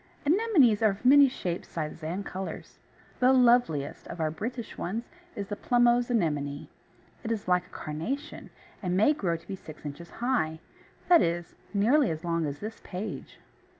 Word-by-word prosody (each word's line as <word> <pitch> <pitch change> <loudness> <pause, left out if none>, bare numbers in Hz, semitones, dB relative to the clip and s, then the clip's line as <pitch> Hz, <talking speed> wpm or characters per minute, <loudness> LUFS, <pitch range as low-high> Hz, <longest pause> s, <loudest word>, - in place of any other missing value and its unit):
Anemones 310 - +4
are 220 - +5
of 200 +5 -6
many 280 +1 +8
shapes, 180 -8 -4
sizes, 155 0 -5
and 180 +6 -3
colours. 190 +1 -7 0.4
The 255 +1 +5
loveliest 240 - +3
of - - -8
our 155 -1 0
British 230 +7 -5
ones 215 +7 -3 0.3
is 200 - -3
the 205 - -2
Plumose 240 +1 +3
Anemone. 150 -10 -1 0.5
It 230 - -3
is 215 -4 -3
like 180 0 +2
a - - -24
carnation, 250 - -5 0.3
and 180 -2 -1
may 220 +10 +5
grow 175 - -1
to 165 - -20
be 195 - -4
six 155 -4 -12
inches 145 +4 -7
high 230 -11 -1 0.5
that 345 -2 +7
is, 170 0 -1 0.2
nearly 235 +7 +3
as 160 +1 -4
long 165 -2 0
as 140 0 -4
this 220 +2 -6
page. 195 +3 -6
200 Hz, 170 wpm, -28 LUFS, 165-245 Hz, 0.5 s, many